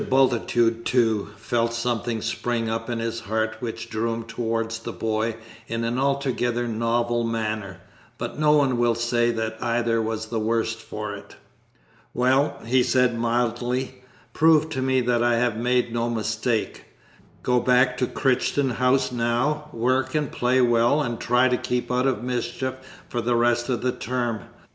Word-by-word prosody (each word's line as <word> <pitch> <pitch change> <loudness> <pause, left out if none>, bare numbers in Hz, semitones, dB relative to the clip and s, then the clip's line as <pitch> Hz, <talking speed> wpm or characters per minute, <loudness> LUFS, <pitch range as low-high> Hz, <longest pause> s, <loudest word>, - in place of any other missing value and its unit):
Bultitude 120 -3 +2
too, 115 -5 +1
felt 115 +1 -1
something 115 -1 -2
spring 120 -2 -1
up 115 +1 -3
in 120 - -1
his 115 0 -3
heart 110 +1 -2
which 115 -2 -5
drew 115 +1 -1
him 115 0 -3
towards 115 0 -2
the - - -6
boy 110 0 -1 0.3
in 115 +1 -2
an 120 +2 -1
altogether 130 -3 0
novel 120 +1 0
manner, 110 -4 -3 0.4
but - - -5
no 150 -1 +4
one 135 -5 +3
will 120 -1 +3
say 120 0 +1
that 110 -1 -3
either 115 -1 +1
was 110 0 -3
the 110 0 -3
worse 115 +1 0
for 105 -2 -6
it. 105 0 -11 0.8
"Well," 135 +3 +2
he 125 +2 +3
said 125 -1 +2
mildly, 120 +2 -1 0.3
"prove 160 -1 +4
to 130 -4 -3
me 130 0 +2
that 120 -1 +1
I 120 0 +3
have 120 -1 +1
made 125 0 +1
no 120 0 0
mistake. 110 0 -2 0.6
Go 125 0 +3
back 125 +1 +3
to 125 - +1
Crichton 135 0 +1
House 125 +2 +2
now, 125 +6 0
work 130 +4 0
and 150 -2 0
play 125 +1 +2
well, 120 +3 +3
and 120 -4 -3
try 125 +1 +3
to 125 -1 +1
keep 125 0 -2
out 125 +1 +2
of 120 -4 -1
mischief 125 +1 -2 0.3
for 120 - -2
the 120 +1 +1
rest 120 +1 +2
of 125 -3 0
the 125 - +2
term. 120 -3 -2
120 Hz, 165 wpm, -24 LUFS, 115-125 Hz, 0.8 s, no